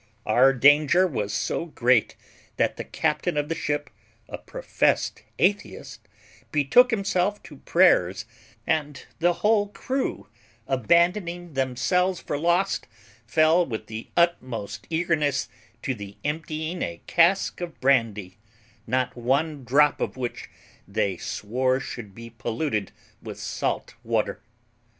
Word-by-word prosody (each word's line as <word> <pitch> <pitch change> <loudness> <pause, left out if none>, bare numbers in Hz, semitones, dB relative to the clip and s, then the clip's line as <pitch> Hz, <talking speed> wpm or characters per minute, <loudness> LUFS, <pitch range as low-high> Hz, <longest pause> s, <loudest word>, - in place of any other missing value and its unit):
Our 125 +5 +5
danger 145 +7 +5
was 105 - -2
so 105 +9 -2
great 125 -6 +2 0.4
that - - +1
the - - -5
captain - - -1
of 145 0 -1
the - - +1
ship, 145 -3 -3 0.4
a - - -7
professed - - -1 0.2
atheist, 205 +3 -1 0.4
betook 155 - +5
himself 200 -2 0
to - - -12
prayers, 105 - +3 0.4
and 150 -3 -1
the 175 +2 +4
whole 210 -1 +4
crew, 260 +6 -3 0.4
abandoning 170 - +1
themselves 135 +8 0
for - - -4
lost, 175 +4 +1 0.4
fell 160 +2 +4
with 110 -8 -5
the 110 +1 -7
utmost 130 -11 0
eagerness 160 -5 0 0.3
to 135 - -1
the 100 -3 -9
emptying 155 +3 -3
a 85 0 -4
cask 180 +2 +2
of 175 -2 -6
brandy, 110 -8 +1 0.5
not 130 +2 0
one 140 +4 0
drop 145 +4 +3
of - - -3
which 125 -2 -5 0.4
they 95 -2 -1
swore 130 +8 -1
should 110 -7 -8
be 115 0 -10
polluted 115 - -2 0.3
with - - -8
salt - - -3
water. - - -1
145 Hz, 120 wpm, -25 LUFS, 120-170 Hz, 0.5 s, Our